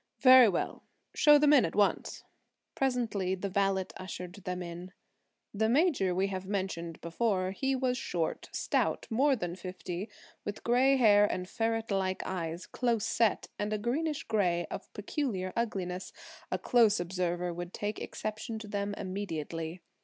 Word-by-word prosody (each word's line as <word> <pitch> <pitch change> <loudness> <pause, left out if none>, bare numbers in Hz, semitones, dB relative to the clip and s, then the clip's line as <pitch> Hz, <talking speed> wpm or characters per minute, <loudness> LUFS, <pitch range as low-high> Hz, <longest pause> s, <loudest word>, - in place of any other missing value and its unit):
"Very 255 -3 +9
well; 175 - -2 0.3
show 295 -1 +7
them 295 0 +5
in, 270 -6 +7
at 165 - -2
once." 205 -1 +1 0.5
Presently 230 -8 0
the 195 +1 -4
valet 195 -1 +1
ushered 180 -1 -7
them 180 -2 -5
in. 175 +2 -8 0.6
The 220 +2 +1
major 255 - +2
we 190 +2 +2
have 190 -1 -5
mentioned 185 -5 -3
before; 185 +1 0
he 270 +7 0
was 255 -1 0
short, 165 -8 -3
stout, - - 0
more 270 +5 +3
than 175 -6 -4
fifty, 185 +1 -6 0.3
with 205 - -6
gray 255 +3 +4
hair 205 -4 +5
and 180 0 -3
ferret 225 +2 -1
like 190 -1 0
eyes, 170 -2 -4
close 235 -4 0
set, 230 -2 +1
and 205 +1 -1
a - - +1
greenish 285 +8 -1
gray 180 -6 +1
of - - -7
peculiar 205 -4 -3
ugliness; 190 -6 -2 0.4
a - - +1
close 225 -5 +4
observer 175 0 -2
would 175 +1 -6
take 210 +2 -3
exception 215 +1 -5
to 215 -1 -8
them 205 0 -2
immediately. 165 -3 -4
200 Hz, 155 wpm, -31 LUFS, 180-230 Hz, 0.6 s, Very